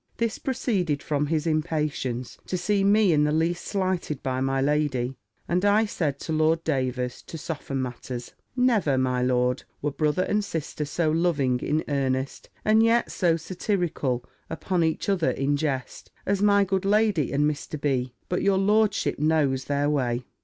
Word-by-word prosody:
This 230 -1 -1
proceeded 195 - -1
from 145 -1 0
his 155 0 0
impatience 150 -6 -2
to 185 - -1
see 195 +3 +1
me 200 -2 +4
in 150 -1 +3
the 150 - +2
least 165 +3 0
slighted 185 -7 -2
by 130 -1 -1
my 135 0 +1
lady; 135 -3 0 0.3
and 180 +2 0
I 205 +2 +4
said 150 -9 -2
to 160 - -3
Lord 160 +1 +2
Davers, 130 -4 -1
to 165 - -7
soften 145 -4 -4
matters, 125 0 -6 0.2
"Never, 225 - +2
my 130 -1 +1
lord, 125 0 +1 0.2
were 145 - -1
brother 155 +5 +1
and 210 +2 0
sister 155 -4 -4
so 155 +2 0
loving 155 -7 +1
in 155 +4 0
earnest, 135 -2 -2 0.2
and 215 +1 +5
yet 230 +1 +3
so 170 -3 +2
satirical 170 - -2 0.2
upon 180 -3 -1
each 160 -1 -1
other 190 -5 +2
in 140 +1 0
jest, 140 -3 -3 0.2
as 200 0 0
my 200 -1 +5
good 190 0 -1
lady 205 - +2
and 145 +1 +1
Mr. 150 0 -3
B. 130 -4 -1
But 180 - -1
your 195 -1 +3
lordship 210 -1 +2
knows 145 -4 +1
their 145 0 0
way." 125 -4 0
155 Hz, 165 wpm, -25 LUFS, 135-185 Hz, 0.3 s, and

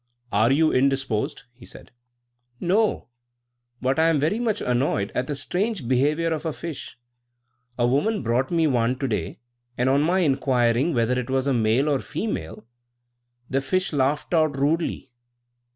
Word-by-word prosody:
"Are 110 +5 +3
you 155 +3 +3
indisposed?" 130 -3 0
he 120 0 -18
said. - - -13 0.7
"No; 200 - +1 0.7
but 130 +4 +1
I 165 +1 +4
am 160 -3 +2
very 160 +10 0
much 220 -3 0
annoyed 120 -5 0
at 130 - -1
the 145 - -3
strange 180 - -2
behaviour 150 +6 +1
of 155 -1 -4
a 160 - -2
fish. 165 -1 -7 0.8
A 120 - +2
woman 145 - +1
brought 120 +3 0
me 165 -2 +2
one 125 -3 +1
to 135 - -2
day, 105 -9 -3 0.4
and 125 +2 +2
on 140 +2 +3
my 180 +5 +2
inquiring 130 -1 +2
whether 120 +2 +1
it 125 0 -5
was 130 0 0
a 140 - +1
male 115 +4 +2
or 145 -3 +1
female, 105 - -5 0.8
the 135 +1 0
fish 185 +4 -1
laughed 145 +2 0
most 155 -4 +2
rudely." 150 -1 -1
135 Hz, 160 wpm, -24 LUFS, 125-160 Hz, 0.8 s, I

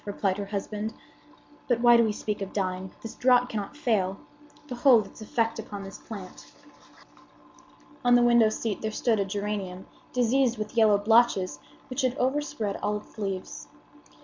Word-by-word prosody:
replied 200 -2 -1
her 200 0 -5
husband 210 +1 -4 0.8
"But 245 -2 +2
why 240 0 +6
do 235 - +6
we 220 - +1
speak 210 0 -4
of 195 - -5
dying? 185 -1 -2
The 225 - -7
draught 250 0 +4
cannot 210 +6 -5
fail. 200 -9 0 0.5
Behold 245 -4 +4
its 200 - -14
effect 225 +1 -1
upon 205 -2 -7
this 195 0 -9
plant." 195 -5 -10 1.5
On 245 0 +5
the 245 - +5
window 235 -2 +5
seat 215 -1 -3
there 220 - -1
stood 220 0 0
a 200 - +1
geranium 200 -2 -4 0.3
diseased 250 0 +2
with 215 +2 -5
yellow 215 -3 +5
blotches, 205 -7 +3 0.3
which 260 +2 -3
had 255 0 0
overspread 260 -6 -1
all 210 0 -1
its 210 - -14
leaves. 195 -3 -5
215 Hz, 160 wpm, -27 LUFS, 200-240 Hz, 1.5 s, why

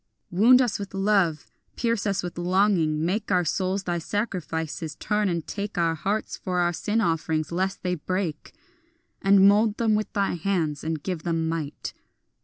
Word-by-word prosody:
Wound 240 +8 +6
us 230 -6 -1
with 200 -1 -6
love, 195 -6 +2 0.3
pierce 230 -3 0
us 195 -2 0
with 175 - -5
longing, 175 -4 +2
make 200 +4 -1
Our 180 -2 +3
souls 190 +4 -1
thy 175 -2 -1
sacrifices; 165 -5 -3
turn 210 -1 0
and 170 -3 -2
take 205 -1 -5
Our 165 -1 +2
hearts 195 +7 -2
for 180 -2 -3
our 175 0 +2
sin 210 +6 0
offerings 160 -4 0
lest 190 +3 -2
they 180 -1 0
break, 180 -1 -3 0.7
And 195 0 +6
mould 210 +1 +4
them 225 -2 +2
with 215 0 -1
thine 200 -3 0
hands 160 -6 -1
and 160 -2 -3
give 180 -4 -3
them 165 -1 -1
might. 160 -3 -4
185 Hz, 170 wpm, -25 LUFS, 165-205 Hz, 0.7 s, Wound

